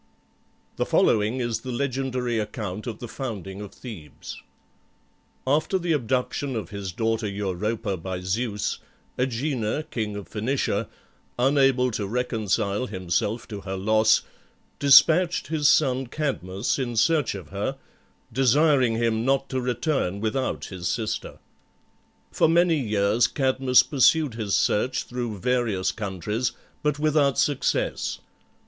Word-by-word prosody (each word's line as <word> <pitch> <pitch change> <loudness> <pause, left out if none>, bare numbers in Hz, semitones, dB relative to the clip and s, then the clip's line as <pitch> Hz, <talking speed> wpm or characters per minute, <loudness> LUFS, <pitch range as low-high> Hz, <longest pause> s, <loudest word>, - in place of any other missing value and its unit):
The - - +1
following 110 +4 +2
is 120 -2 -1
the 130 +2 -6
legendary 125 -2 -1
account 105 -1 -5
of 115 -3 -4
the 120 - -7
founding 105 -6 -6
of 100 -2 -8
Thebes: 100 - -10 1.0
After 155 +7 +2
the 175 -2 -2
abduction 130 0 -1
of 110 - -4
his 100 -2 -5
daughter 110 +3 -1
Europa 100 +1 -2
by 90 +1 -5
Zeus, 105 +3 -2 0.4
Agenor, 125 +1 -1
king 110 -3 -3
of 100 -4 -7
Phoenicia, 110 0 -1 0.5
unable 135 -1 +3
to 105 -2 -3
reconcile 110 -1 -1
himself 95 +4 -2
to 105 -3 -6
her 95 0 -5
loss, 110 +3 +3 0.6
despatched 165 +6 +5
his 150 -2 +3
son 130 -3 +3
Cadmus 120 -7 -2
in 120 -3 -2
search 130 +1 +2
of 90 -6 -9
her, 100 +8 -3 0.6
desiring 135 -1 +3
him 115 -1 +1
not 135 +1 +1
to 130 -1 -1
return 125 - -1
without 110 +5 -2
his 90 -3 -5
sister. 110 0 -3 0.9
For - - +3
many 170 -1 +4
years 105 -1 +2
Cadmus 130 -2 +3
pursued 150 0 +3
his 110 -3 -1
search 125 +5 +1
through 120 -4 -4
various 115 -4 0
countries, 105 +4 -3 0.3
but 150 -2 0
without 150 -2 +2
success. 145 -3 0
120 Hz, 125 wpm, -25 LUFS, 105-135 Hz, 1.0 s, despatched